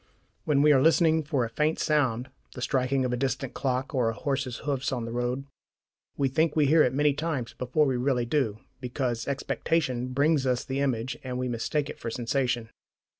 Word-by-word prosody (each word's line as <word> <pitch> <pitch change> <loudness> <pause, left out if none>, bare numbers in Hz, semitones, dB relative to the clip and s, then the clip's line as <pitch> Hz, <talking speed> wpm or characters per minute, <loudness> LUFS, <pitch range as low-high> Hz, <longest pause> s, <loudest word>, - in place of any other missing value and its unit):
When 145 -2 +3
we 150 - +6
are 135 -3 +5
listening 160 +1 +4
for 140 -5 0
a - - -6
faint 150 +6 +1
sound 130 -5 0 0.2
the 125 - -7
striking 130 +1 +1
of 125 - -1
a - - +2
distant 135 +1 -2
clock, 130 +1 -2
or 125 -4 +2
a 115 - -3
horse's 135 -3 -2
hoofs 140 -2 -1
on 120 -3 -2
the 115 - -5
road 125 +3 -2 0.7
we 140 - +2
think 155 +4 +1
we 155 -2 +4
hear 155 +3 +5
it 125 - +4
many 145 +2 +2
times 145 -5 -3
before 130 +5 +1
we 130 -3 0
really 125 -1 +1
do, 120 -5 0 0.2
because 125 -2 -2
expectation 135 -2 -1
brings 140 +2 +2
us 125 -1 0
the 135 +1 -3
image, 130 -2 -1
and 125 -1 -4
we 125 0 -1
mistake 125 +5 -1
it - - -8
for - - -4
sensation. 120 -1 -1
130 Hz, 200 wpm, -27 LUFS, 125-145 Hz, 0.7 s, we